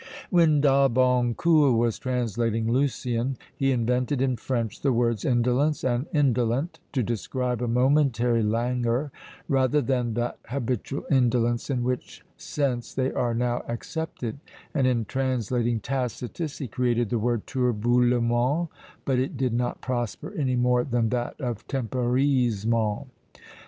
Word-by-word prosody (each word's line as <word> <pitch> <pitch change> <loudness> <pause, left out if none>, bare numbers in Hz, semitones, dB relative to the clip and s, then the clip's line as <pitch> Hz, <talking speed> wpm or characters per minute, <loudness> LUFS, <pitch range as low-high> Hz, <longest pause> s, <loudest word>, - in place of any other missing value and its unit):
When 165 -5 +4
D'Albancourt 130 +1 +3
was 115 -1 +1
translating 115 -3 -1
Lucian, 130 -1 0 0.2
he 135 -2 +1
invented 125 +2 0
in 130 -1 +1
French 115 -2 -3
the 140 - +2
words 115 -3 +1
indolence 125 +4 +1
and 125 +3 0
indolent, 130 0 +1
to 130 -4 +1
describe 120 +3 -2
a 120 - -1
momentary 125 -2 +2
languor, 120 +4 0 0.4
rather 135 0 +2
than 125 -5 0
that 120 0 -2
habitual 130 +1 -3
indolence 120 -2 +2
in 125 -3 0
which 125 0 -4
sense 130 -5 -2
they 130 0 0
are 120 -2 0
now 120 +1 0
accepted; 130 0 -5 0.3
and 130 -2 +2
in 120 -3 +1
translating 120 -2 0
Tacitus, 130 - -3
he 135 - -4
created 120 -1 0
the 120 - +1
word 120 0 0
turbulemment; 125 +4 +1 0.4
but 130 -2 +1
it 130 +2 -2
did 130 -2 0
not 120 +1 -1
prosper 120 -3 -3
any 130 -4 0
more 125 0 +2
than 120 -4 0
that 120 0 -3
of 120 -6 -4
temporisement. 120 -4 0
125 Hz, 130 wpm, -26 LUFS, 120-135 Hz, 0.4 s, When